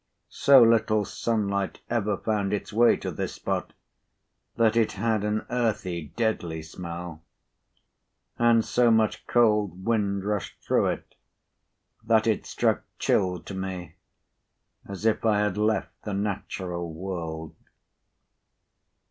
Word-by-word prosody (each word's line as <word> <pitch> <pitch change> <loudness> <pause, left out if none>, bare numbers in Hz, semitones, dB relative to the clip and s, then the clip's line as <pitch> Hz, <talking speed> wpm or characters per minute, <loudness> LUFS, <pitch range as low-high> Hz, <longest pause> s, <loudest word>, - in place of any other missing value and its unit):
So 135 -3 +6
little 110 -2 +3
sunlight 100 -4 -2
ever 105 -4 0
found 105 -2 -1
its 105 +1 -3
way 120 +2 +5
to - - -4
this - - -4
spot, - - -3 0.8
that 115 -1 +3
it 115 -2 +2
had 110 0 0
an 105 +1 -1
earthy 105 -9 -1
deadly 85 -9 -1
smell; 85 -1 -7 1.2
and 115 -1 +4
so 120 -1 +3
much 110 -1 +2
cold 105 -6 +2
wind 100 -4 0
rushed 105 -3 -3
through - - +2
it, - - -4 0.9
that 110 -1 +3
it 110 -3 0
struck - - +1 0.2
chill 90 -1 +1
to - - -8
me, 95 -3 -5 0.9
as 100 +2 -7
if 110 - +2
I 105 -2 +3
had 105 -3 0
left 105 -1 0
the 105 -2 -3
natural 95 -4 -3
world. 80 -2 -5
105 Hz, 125 wpm, -26 LUFS, 95-110 Hz, 1.2 s, So